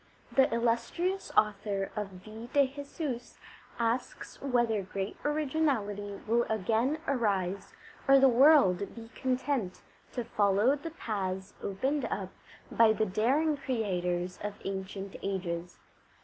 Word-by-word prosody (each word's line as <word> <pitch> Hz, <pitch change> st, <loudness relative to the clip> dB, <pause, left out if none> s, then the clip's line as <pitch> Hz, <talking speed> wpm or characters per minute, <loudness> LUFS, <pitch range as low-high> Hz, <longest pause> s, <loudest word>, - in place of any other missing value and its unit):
The 265 Hz, -, +4 dB
illustrious 235 Hz, +12 st, 0 dB
author 200 Hz, -2 st, +1 dB
of 195 Hz, -3 st, -5 dB
the 220 Hz, +2 st, -9 dB
Vie -, -, -21 dB
de 285 Hz, -2 st, +4 dB
Jesus 280 Hz, -4 st, -5 dB, 0.4 s
asks 235 Hz, +2 st, -2 dB
whether 240 Hz, -5 st, +1 dB
great 195 Hz, +1 st, -4 dB
originality 265 Hz, -10 st, 0 dB
will 235 Hz, +2 st, +3 dB
again 225 Hz, +7 st, +1 dB
arise 200 Hz, -7 st, 0 dB, 0.3 s
or 275 Hz, 0 st, +8 dB
the 270 Hz, 0 st, +7 dB
world 245 Hz, -, +5 dB
be 225 Hz, -1 st, -9 dB
content 255 Hz, -6 st, -1 dB, 0.3 s
to 245 Hz, -, -2 dB
follow 210 Hz, +3 st, +3 dB
the 300 Hz, +3 st, -6 dB
paths 195 Hz, -, -4 dB
opened 265 Hz, +9 st, -1 dB, 0.6 s
by 225 Hz, -1 st, +5 dB
the 220 Hz, -, +1 dB
daring 260 Hz, +11 st, +2 dB
creators 180 Hz, -9 st, -2 dB
of 210 Hz, 0 st, -4 dB
ancient 195 Hz, 0 st, -5 dB
ages. 175 Hz, -3 st, -3 dB
220 Hz, 120 wpm, -30 LUFS, 195-265 Hz, 0.6 s, or